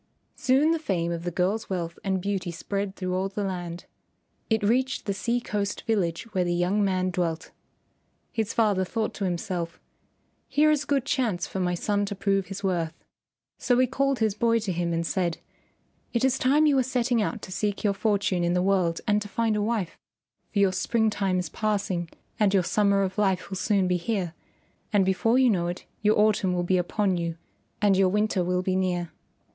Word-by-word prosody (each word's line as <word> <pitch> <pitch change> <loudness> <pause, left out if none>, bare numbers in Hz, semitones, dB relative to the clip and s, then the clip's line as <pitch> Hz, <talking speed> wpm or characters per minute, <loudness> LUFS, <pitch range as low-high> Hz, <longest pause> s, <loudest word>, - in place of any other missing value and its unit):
Soon 275 +5 +3
the 330 - +1
fame 175 - -1
of 170 0 -4
the - - 0
girl's 190 +5 -1
wealth 170 -3 -3
and 190 -1 0
beauty 195 -2 -2
spread 195 +3 -3
through 185 -1 -3
all 190 +1 0
the 205 +1 -3
land. 175 -3 -4 0.6
It 220 -2 +1
reached 255 +5 +1
the 200 - 0
sea 235 +5 0
coast 205 -4 -3
village 180 -7 0
where 185 - +2
the 175 0 0
young 185 +4 +1
man 185 -1 +1
dwelt. 170 -2 -2 0.8
His 225 -2 -1
father 205 -4 +2
thought 220 +4 -2
to 200 - -3
himself, 175 -1 -3 0.7
"Here 305 +1 +4
is 295 -1 +1
a - - -29
good 275 -3 +1
chance 230 -11 0
for 190 - -5
my 180 -1 0
son 205 +3 0
to 200 - -4
prove 195 -1 0
his 195 +1 -7
worth." 170 -4 -1 0.6
So 245 - +2
he 255 - +5
called 275 +2 0
his 220 -3 +1
boy 230 +2 +2
to 205 -3 -2
him 170 -1 -1
and 165 0 -1
said, 175 -1 -1 0.8
"It 235 +2 +2
is 265 -1 +2
time 290 +4 +4
you 290 -2 +4
were - - +5
setting 245 -2 +1
out 215 +1 -2
to - - -8
seek 205 +2 -2
your 205 -2 +2
fortune 195 -2 0
in 175 0 +1
the 180 0 +2
world 185 -4 +1
and 210 0 +2
to 205 - -5
find 220 +2 0
a 210 - 0
wife, 210 -5 -2 0.5
for - - -4
your 195 -2 +4
spring 220 +4 +1
time 195 -3 0
is 180 - -1
passing 195 -5 -1 0.3
and 205 -2 +3
your 190 - +4
summer 200 +1 +2
of 190 +1 -3
life 190 -2 +1
will 190 - -3
soon 195 -1 +2
be 180 0 +2
here, 180 -2 -2 0.6
and 205 -3 +3
before 225 +6 +2
you 260 -2 +5
know 175 -4 0
it 175 +1 -5 0.2
your 215 0 +3
autumn 210 -3 +3
will 175 0 0
be 185 +1 +2
upon 190 +1 0
you 170 -1 -3 0.5
and 200 -2 +5
your 190 0 +4
winter 210 -1 +1
will 180 +1 0
be 185 0 0
near. 180 -3 -1
195 Hz, 205 wpm, -26 LUFS, 180-220 Hz, 0.8 s, he